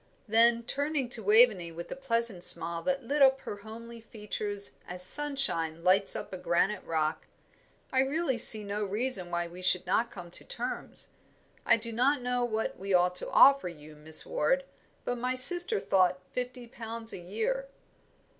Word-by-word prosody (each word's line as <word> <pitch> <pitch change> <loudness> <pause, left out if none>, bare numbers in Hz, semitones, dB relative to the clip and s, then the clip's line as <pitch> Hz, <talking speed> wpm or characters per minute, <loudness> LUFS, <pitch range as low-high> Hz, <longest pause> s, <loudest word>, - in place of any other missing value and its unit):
Then 230 +2 +2
turning 285 +1 -3
to 235 - -4
Waveney 210 -4 +2
with 170 +1 -10
a - - -5
pleasant 230 -8 -1
smile 170 -1 +4
that 275 +3 -3
lit 285 +5 -3
up 265 0 +4
her 205 - -8
homely 230 +2 -12
features 210 -2 -4
as 180 0 -4
sunshine 185 - +3
lights 190 +2 +2
up - - -8
a - - -6
granite 185 +3 -1
rock, 155 -1 -3 0.6
"I 260 - 0
really 270 -1 -2
see 215 -1 +7
no 205 +1 -5
reason 205 -2 0
why 175 0 -4
we 175 +2 -13
should 185 0 +1
not 230 +1 -1
come 175 -5 -12
to - - -2
terms. - - -7 0.6
I - - +4
do 230 +1 -7
not 255 +3 0
know 250 0 -2
what 220 -5 -4
we 195 0 -2
ought 180 0 +1
to - - -3
offer 275 -8 +4
you, 155 -2 -15
Miss 155 +1 +2
Ward, - - -1 0.4
but 245 -1 -4
my 250 +1 -3
sister 350 - +6
thought 185 -1 0
fifty 250 0 -6
pounds 230 -1 -8
a - - -8
year." 485 - -4
220 Hz, 175 wpm, -27 LUFS, 180-255 Hz, 0.6 s, see